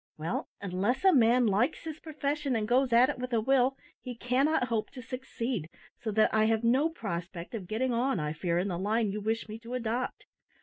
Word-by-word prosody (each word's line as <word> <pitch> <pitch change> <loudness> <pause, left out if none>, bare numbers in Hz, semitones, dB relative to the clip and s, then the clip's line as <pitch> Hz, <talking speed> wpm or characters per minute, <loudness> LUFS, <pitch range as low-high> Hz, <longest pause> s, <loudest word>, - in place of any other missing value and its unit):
Well, 160 +3 -3
unless 200 - -1
a 380 - +7
man 245 -1 +5
likes 215 +4 +1
his 315 -2 -6
profession, 295 -3 -2
and 215 -2 -1
goes 255 +2 +3
at 240 +2 +6
it 290 - -3
with 250 0 -4
a 230 - +3
will, 265 +3 +2 0.2
he 250 -2 -7
cannot 255 +3 +1
hope 225 -2 -1
to 255 - -8
succeed, 240 - -4 0.3
so 225 - -4
that 215 +1 +3
I 220 0 +4
have 225 0 +1
no 260 +7 +3
prospect 175 - -6
of 205 -6 -5
getting 245 +5 0
on, 245 -2 +1
I 150 0 -2
fear, 170 +2 -1
in 185 +3 0
the 175 -2 -3
line 210 +2 +1
you 210 +1 -4
wish 220 +2 -1
me 215 +1 -7
to 235 +2 -6
adopt. 250 - -3
235 Hz, 215 wpm, -30 LUFS, 210-260 Hz, 0.3 s, a